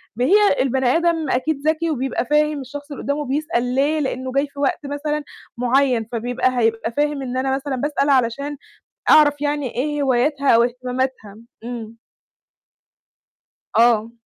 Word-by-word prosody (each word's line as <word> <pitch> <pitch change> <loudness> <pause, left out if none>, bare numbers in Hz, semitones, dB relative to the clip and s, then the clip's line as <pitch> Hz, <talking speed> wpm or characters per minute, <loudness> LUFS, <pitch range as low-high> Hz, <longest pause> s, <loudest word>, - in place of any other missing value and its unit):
ما 245 +3 0
هي 405 0 +4
البني 265 0 0
آدم 335 -3 0
أكيد 280 +3 -1
ذكي 320 +1 +1
وبيبقى 270 -4 -2
فاهم 300 +1 +1
الشخص 285 +3 -9
اللي 285 - -7
قُدّامه 290 +2 -2
بيسأل 255 -3 -1
ليه، 290 +4 +2
لإنّه 260 -2 -3
جاي 275 +2 +1
في 280 0 -13
وقت 280 -2 0
مثلًا 295 +1 -3 0.3
معيّن، 250 -1 +2
فبيبقى 245 +2 -1
هيبقى 225 0 0
فاهم 290 +2 -1
إن 255 -1 -4
أنا 265 +1 0
مثلًا 275 0 -3
باسأل 285 +2 -1
علشان 275 +2 +1 0.5
أعرف 290 -2 +6
يعني 290 -3 -2
إيه 295 +3 -1
هواياتها 275 +2 +1
أو 230 0 +6
اهتماماتها. 250 -3 -3 0.3
إمم. 230 -2 -7 1.8
آه. 230 -1 +4
270 Hz, 145 wpm, -21 LUFS, 245-295 Hz, 1.8 s, أعرف